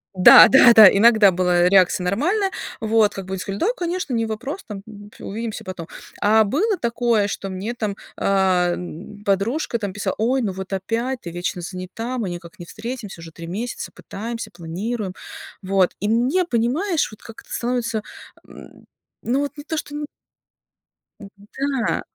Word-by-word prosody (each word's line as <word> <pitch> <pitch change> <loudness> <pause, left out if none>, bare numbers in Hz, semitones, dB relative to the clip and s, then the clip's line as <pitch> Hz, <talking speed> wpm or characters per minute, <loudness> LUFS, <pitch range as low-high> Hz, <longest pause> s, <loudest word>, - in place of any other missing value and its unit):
да-да-да, 220 +3 +9
иногда 215 -2 +6
была 180 0 +2
реакция 185 -1 +4
нормальная. 350 - +1 0.3
Вот. 220 -1 +2
Как 195 - -6
бы 190 - -9
они 190 - -3
сказали: 195 +2 -5
"Да, - - +1
конечно, 350 -5 -3
не 230 0 0
вопрос, 250 - -5
там, 205 -3 -7 0.4
увидимся 220 +2 -5
потом". 185 -3 -7 0.3
А 220 +2 +5
было 375 - 0
такое, 235 - +1
что 195 -1 -5
мне 190 +5 -4
там, 215 -4 -3 0.2
а, 185 -3 +2 0.5
подружка 225 +7 0
там 200 -3 -4
писала: 205 - -3
"Ой, 250 +4 +1
ну 210 -5 -1
вот 190 +1 -7
опять 230 +7 -2
ты 170 - -7
вечно 175 +1 -4
занята, 185 +8 -6
мы 215 -6 -2
никак 175 +2 -10
не 175 - -8
встретимся. 220 -2 -7
Уже 165 0 -10
3 165 +1 -10
месяца, 220 +8 -5
пытаемся, 230 +3 -7
планируем". 185 +5 -5 0.5
Вот. 190 -1 +2
И 205 - -1
мне, 250 +11 +2
понимаешь, 305 - 0
вот 215 - -14
как 225 - -12
то - - -20
становится, 235 -2 -2 1.2
ну 250 +4 0
вот 285 +1 -4
не 290 - -8
то 320 0 -3
что 290 -1 -5
н 295 0 -4 1.1
М, 200 - -10 0.6
да. - - -1
215 Hz, 160 wpm, -21 LUFS, 190-245 Hz, 1.2 s, да-да-да